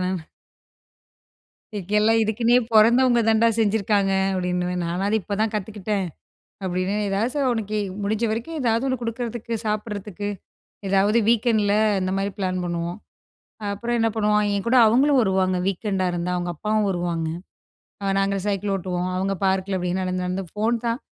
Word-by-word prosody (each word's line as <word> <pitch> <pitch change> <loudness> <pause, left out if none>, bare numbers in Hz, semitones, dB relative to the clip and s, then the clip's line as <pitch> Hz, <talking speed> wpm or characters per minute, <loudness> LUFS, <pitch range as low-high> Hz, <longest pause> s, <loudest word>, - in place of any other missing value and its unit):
அப்டிம்பேன் - - 0
நானு. 185 -3 -2 1.6
இங்கெல்லாம் 210 +4 +2
இதுக்குன்னே 230 +3 +2 0.2
பொறந்தவங்க 240 +3 +5
தாண்டா 225 +1 +4
செஞ்சிருக்காங்க 205 -2 +2 0.2
அப்டின்னுவேன். 180 -1 -1
நானாது 190 +5 -1
இப்பதான் 205 +3 -1
கத்துக்கிட்டேன் 205 -1 -2 0.6
அப்டின்னு. 185 +2 -1
ஏதாவது 200 +5 0
ச - - -1
அவனுக்கு 215 -3 -1 0.3
முடிஞ்ச 215 +3 -1
வரைக்கும் 235 +9 -4
ஏதாவது 230 +1 +1
ஒண்ணு 260 -1 0
குடுக்குறதுக்கு 235 0 -4
சாப்பிடறதுக்கு 210 -2 -3 0.6
ஏதாவது 195 +3 +3
வீக்கெண்டுல 220 -3 +2 0.3
இந்த 185 0 -1
மாரி 195 +1 -1
பிளான் 185 -1 -1
பண்ணுவோம். 170 +1 -3 0.6
ஆ - - -8
அப்புறம் 235 +3 -2
என்ன 225 0 +3
பண்ணுவாங்க, 210 -1 +2
என் 200 +2 -3
கூட 255 +2 +4
அவங்களும் 265 +5 +4
வருவாங்க. 190 -3 +1
வீக்கெண்டா 195 0 -1
இருந்தா 175 +1 -2
அவங்க 175 0 -2
அப்பாவும் 215 +4 0
வருவாங்க. 175 -3 -2 0.8
ஆ 195 - +1
நாங்க 195 0 +1
சைக்கிள் 200 0 -1
ஓட்டுவோம், 180 -1 -3
அவங்க 195 +1 0
பார்க்குல 190 0 0
அப்டின்னு 180 +1 -1
நடந்து, 185 0 -2
நடந்து 185 +1 -2
ஃபோன் 220 +3 +1
தான். 230 +3 -1
205 Hz, 145 wpm, -23 LUFS, 185-225 Hz, 1.6 s, பொறந்தவங்க